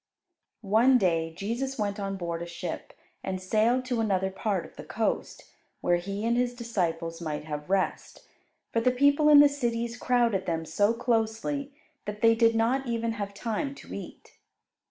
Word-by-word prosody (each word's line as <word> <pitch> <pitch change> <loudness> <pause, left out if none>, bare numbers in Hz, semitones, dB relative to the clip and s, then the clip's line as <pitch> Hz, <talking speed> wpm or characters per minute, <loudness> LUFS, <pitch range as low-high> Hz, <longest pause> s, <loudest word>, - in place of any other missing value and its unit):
One 230 +6 +5
day 165 -6 +1
Jesus 250 +6 -3
went 205 -1 -2
on 195 -1 -3
board 170 -2 -4
a 170 - -5
ship 170 0 -6 0.3
and 190 -1 -3
sailed 225 +7 +1
to 245 -3 -1
another 190 -3 0
part 195 -1 -2
of - - -15
the - - -9
coast, - - -2 0.4
where 175 - +3
He 200 +4 -4
and 235 +1 +2
His 245 0 0
disciples 170 -8 -2
might 155 -3 -3
have 150 +1 -6
rest. 195 -1 -1 0.5
For 230 - +2
the 255 - +4
people 285 +4 +4
in 290 -1 +9
the 290 - +8
cities 235 -4 -2
crowded 235 -6 +1
them 165 -1 -1
so 205 +8 +1
closely 235 +4 -1 0.3
that 210 0 -6
they 230 0 +6
did 230 0 +3
not 250 +4 +1
even 230 -1 -1
have 200 -2 -5
time 235 +7 -3
to - - -11
eat. - - -10
225 Hz, 175 wpm, -28 LUFS, 190-245 Hz, 0.5 s, in